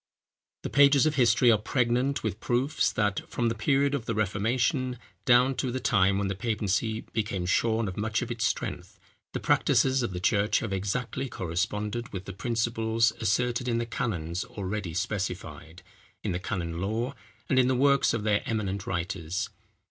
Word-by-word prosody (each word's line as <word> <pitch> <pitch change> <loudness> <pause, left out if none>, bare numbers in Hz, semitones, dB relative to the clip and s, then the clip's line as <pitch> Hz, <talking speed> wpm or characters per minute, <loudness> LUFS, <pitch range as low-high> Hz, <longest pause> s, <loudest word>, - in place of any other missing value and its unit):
The - - -3
pages 140 0 +6
of 155 - +2
history 120 -2 +4
are 110 - +3
pregnant 125 +4 0
with 110 -1 -2
proofs 130 +7 +1
that, 105 -3 0
from 120 -1 0
the - - 0
period 140 +5 +1
of 135 -6 -2
the 115 - -1
Reformation, 120 - 0 0.3
down 125 +2 +5
to 130 - -1
the 130 - -2
time 100 -6 +3
when 100 0 0
the 95 - -1
papacy 110 +1 -1
became 105 -5 -2
shorn 110 +4 +1
of 95 - -6
much 110 +3 -1
of 125 - -6
its 115 -1 -2
strength, - - -3 0.3
the - - -2
practices 130 0 +3
of 120 - -1
the 90 - -4
church 100 +3 +2
have 110 -4 -2
exactly 125 +7 -2
corresponded 105 +6 -3
with 95 -1 -6
the 100 - -6
principles 115 +1 +1
asserted 120 +3 0
in 115 -1 +1
the 120 - -1
canons 90 -7 -3
already 105 -7 -5
specified, 90 -3 -4 0.4
in - - -1
the 90 - -2
canon 85 -2 -3
law, 115 +7 -1 0.3
and 130 - +3
in 125 - +4
the 130 - +2
works 140 +1 +4
of 115 -3 -2
their 105 -1 +2
eminent 100 -3 -2
writers. 90 -1 -3
110 Hz, 175 wpm, -28 LUFS, 95-125 Hz, 0.4 s, pages